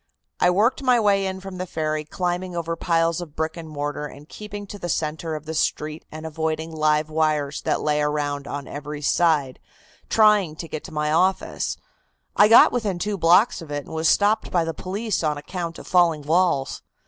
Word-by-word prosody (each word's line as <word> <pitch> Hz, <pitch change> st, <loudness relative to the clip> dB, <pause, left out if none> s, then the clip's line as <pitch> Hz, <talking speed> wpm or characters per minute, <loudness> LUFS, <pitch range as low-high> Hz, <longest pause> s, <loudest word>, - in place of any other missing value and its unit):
I 180 Hz, -, +4 dB
worked 210 Hz, +10 st, +2 dB
my 250 Hz, -3 st, +4 dB
way 200 Hz, -2 st, +2 dB
in 190 Hz, 0 st, -4 dB
from 195 Hz, -1 st, -8 dB
the 185 Hz, -, -3 dB
ferry, 155 Hz, -2 st, -2 dB
climbing 180 Hz, +2 st, -3 dB
over 165 Hz, -1 st, -2 dB
piles 165 Hz, 0 st, +1 dB
of 160 Hz, -4 st, -9 dB
brick 160 Hz, 0 st, -2 dB
and 165 Hz, -2 st, -8 dB
mortar 145 Hz, 0 st, -4 dB
and 145 Hz, +1 st, -13 dB
keeping 205 Hz, +1 st, -8 dB
to 205 Hz, +1 st, -9 dB
the 175 Hz, -, -5 dB
centre 160 Hz, +1 st, -2 dB
of 155 Hz, 0 st, -7 dB
the 160 Hz, -, -5 dB
street 155 Hz, 0 st, -2 dB
and 155 Hz, +1 st, -8 dB
avoiding 160 Hz, 0 st, -3 dB
live 155 Hz, -1 st, +1 dB
wires 155 Hz, -2 st, 0 dB
that -, -, 0 dB
lay 150 Hz, 0 st, +1 dB
around 145 Hz, -1 st, -1 dB
on 145 Hz, -1 st, -5 dB
every 150 Hz, 0 st, -7 dB
side, 150 Hz, -4 st, +2 dB, 0.5 s
trying 210 Hz, -7 st, +4 dB
to 165 Hz, -, -7 dB
get 155 Hz, -1 st, -6 dB
to 185 Hz, -, -9 dB
my 150 Hz, -1 st, -1 dB
office. 185 Hz, +4 st, 0 dB, 0.6 s
I 205 Hz, -, +7 dB
got 225 Hz, -, +8 dB
within 215 Hz, -7 st, -1 dB
two 205 Hz, +4 st, -2 dB
blocks 175 Hz, +6 st, +4 dB
of 165 Hz, -, -10 dB
it 145 Hz, -1 st, -4 dB
and -, -, -10 dB
was 160 Hz, 0 st, +2 dB
stopped 210 Hz, +2 st, +2 dB
by 175 Hz, -2 st, +2 dB
the 165 Hz, 0 st, -3 dB
police 200 Hz, +2 st, -3 dB
on 150 Hz, -1 st, 0 dB
account 170 Hz, +2 st, -5 dB
of -, -, -10 dB
falling 170 Hz, -4 st, +3 dB
walls. 160 Hz, -3 st, +1 dB
160 Hz, 200 wpm, -23 LUFS, 150-185 Hz, 0.6 s, got